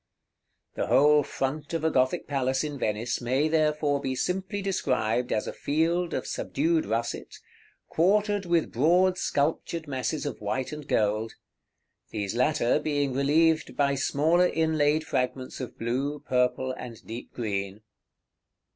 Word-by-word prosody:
The - - -2
whole 145 +6 +5
front 145 +4 -3
of 160 - -2
a 160 - +2
Gothic 130 -1 +1
palace 130 -1 0
in 145 -2 -4
Venice 110 +3 -1
may, 130 +5 +1
therefore, 150 -2 +1
be 130 -1 -2
simply 190 +7 -2
described 125 - 0
as 105 - 0
a - - -5
field 165 +4 0
of - - -3
subdued 160 +3 0
russet, 115 +2 -3 0.5
quartered 205 +3 +2
with 170 -2 +1
broad 180 +8 +3
sculptured 160 +2 -1
masses 140 +3 -2
of 140 -7 -5
white 130 +5 -2
and 150 -2 -7
gold; 110 +1 0 0.8
these 100 -2 -3
latter 130 +1 +2
being 145 -3 -1
relieved 155 +4 +2
by 140 -1 +3
smaller 160 +6 +2
inlaid 155 -2 +1
fragments 130 -2 -2
of 130 - -7
blue, 135 +5 -1
purple, 130 -1 0
and 120 -3 -9
deep 115 +2 -8
green. 100 -2 -3
140 Hz, 140 wpm, -27 LUFS, 125-160 Hz, 0.8 s, whole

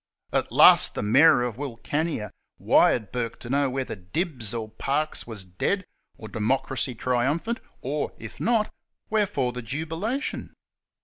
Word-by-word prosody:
At - - 0
last - - +7
the - - -2
Mayor 120 +4 +6
of 120 -2 -3
Wilcannia 145 -1 -3 0.3
wired 110 -5 +3
Bourke 120 -2 -3
to 120 - -7
know 140 0 +2
whether 130 0 -3
Dibbs 115 - -3
or 115 -2 -3
Parkes 140 +7 -2
was 110 -4 -6
dead, 140 - -1 0.3
or 110 - -9
democracy 125 +3 -1
triumphant, 140 - 0 0.2
or 145 +3 -2
if 110 - -10
not, 225 -2 +1 0.4
wherefore 205 - +1
the 125 - -5
jubilation 165 - -3
130 Hz, 135 wpm, -26 LUFS, 115-160 Hz, 0.4 s, last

